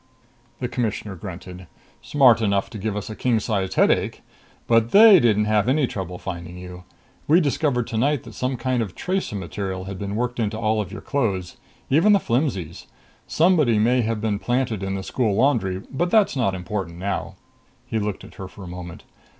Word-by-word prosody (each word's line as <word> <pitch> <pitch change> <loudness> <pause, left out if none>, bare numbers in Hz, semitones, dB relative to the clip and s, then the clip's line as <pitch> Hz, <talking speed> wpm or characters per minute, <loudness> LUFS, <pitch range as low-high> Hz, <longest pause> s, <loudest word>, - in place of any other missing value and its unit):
The 125 - -2
Commissioner 110 -4 -3
grunted. 90 0 -9 0.3
"Smart 130 -6 +4
enough 100 -2 0
to 110 - -7
give 105 0 -2
us 105 +1 -5
a - - -6
king 120 -1 +1
sized 100 -3 -2
headache! - - +2 0.4
But 115 -1 +3
they 210 - +8
didn't 105 -5 +3
have 105 +2 +2
any 140 +1 +3
trouble 95 -6 -5
finding 85 -1 -7
you. 90 0 -10 0.4
We 160 +4 +6
discovered 140 -5 0
tonight 130 +4 0
that - - -11
some 130 0 -2
kind 130 0 0
of 100 -6 -5
tracer 185 - -2
material 95 +1 -4
had 95 0 -7
been 100 0 -4
worked 120 +1 -2
into 110 -1 -1
all 110 -1 +1
your 95 - -9
clothes. 100 -11 -2 0.3
Even 170 +10 +5
the 200 - +5
flimsies. 115 - -2 0.4
Somebody 155 - +3
may 120 +4 +3
have 115 -1 -1
been 105 -2 -1
planted 120 -4 -1
in 95 0 -2
the 95 - -4
school 110 -1 0
laundry, 100 -8 +1
but 175 +6 0
that's 210 -5 +3
not 115 -8 +1
important 90 -2 -4
now." 100 +2 -3 0.5
He 110 - -2
looked 105 -2 -3
at - - -13
her 95 - -5
for 95 +2 -12
a - - -8
moment. 90 -1 -8
110 Hz, 185 wpm, -23 LUFS, 95-125 Hz, 0.5 s, they